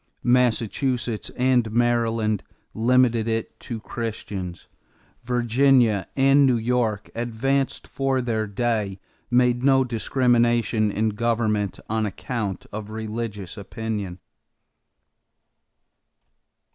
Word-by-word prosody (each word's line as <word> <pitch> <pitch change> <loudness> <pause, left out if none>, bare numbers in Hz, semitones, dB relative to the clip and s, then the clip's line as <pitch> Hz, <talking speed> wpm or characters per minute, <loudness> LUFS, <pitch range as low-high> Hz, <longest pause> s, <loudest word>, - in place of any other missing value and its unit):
Massachusetts 120 -1 +1
and 125 -3 +2
Maryland 115 -3 +1 0.3
limited 120 -1 +3
it 115 -1 -3
to 115 -2 -6
Christians. 105 -6 -5 0.6
Virginia 120 -4 +3
and 135 +1 +5
New 125 -2 +3
York, 115 -3 -1
advanced 125 +4 -1
for 135 -1 -1
their 110 -3 -1
day, 105 -2 -1 0.3
made 125 0 +3
no 135 -1 +5
discrimination 120 -2 +2
in 110 +2 0
government 110 -2 0
on 110 0 0
account 105 0 -4
of 105 0 -5
religious 110 -3 -5
opinion. 105 -3 -4
115 Hz, 90 wpm, -24 LUFS, 110-125 Hz, 0.6 s, and